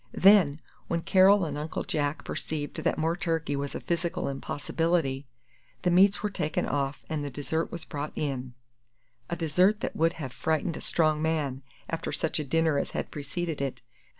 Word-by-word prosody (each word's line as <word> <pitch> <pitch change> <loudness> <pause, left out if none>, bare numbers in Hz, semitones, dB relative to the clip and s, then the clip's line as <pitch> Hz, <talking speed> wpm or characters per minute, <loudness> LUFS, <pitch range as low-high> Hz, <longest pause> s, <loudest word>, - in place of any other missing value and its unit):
Then, 185 -7 +6 0.3
when 170 -1 -1
Carol 190 +2 +6
and 145 -2 -3
Uncle 155 +1 -3
Jack 145 -1 -1
perceived 150 -2 -4
that - - 0
more 160 +2 +1
turkey 165 -5 -1
was 140 0 -3
a - - -2
physical 170 0 -1
impossibility, 145 0 -1 0.6
the 180 - +3
meats 195 +3 +5
were 210 - 0
taken 155 -5 -1
off 140 0 -2
and 155 -2 -2
the 145 - -3
dessert 155 +4 -2
was 170 -2 -5
brought 150 0 -4
in 130 -4 -3 0.7
a 170 - -1
dessert 180 +6 +3
that - - -3
would 165 +1 +3
have 135 -7 -6
frightened 160 +1 0
a - - -7
strong 155 -2 +2
man 150 -5 0 0.3
after 165 0 -3
such 160 - -1
a - - -1
dinner 160 0 +2
as - - -2
had - - -3
preceded 155 +2 -3
it. 135 -3 -3
160 Hz, 180 wpm, -28 LUFS, 145-170 Hz, 0.7 s, Then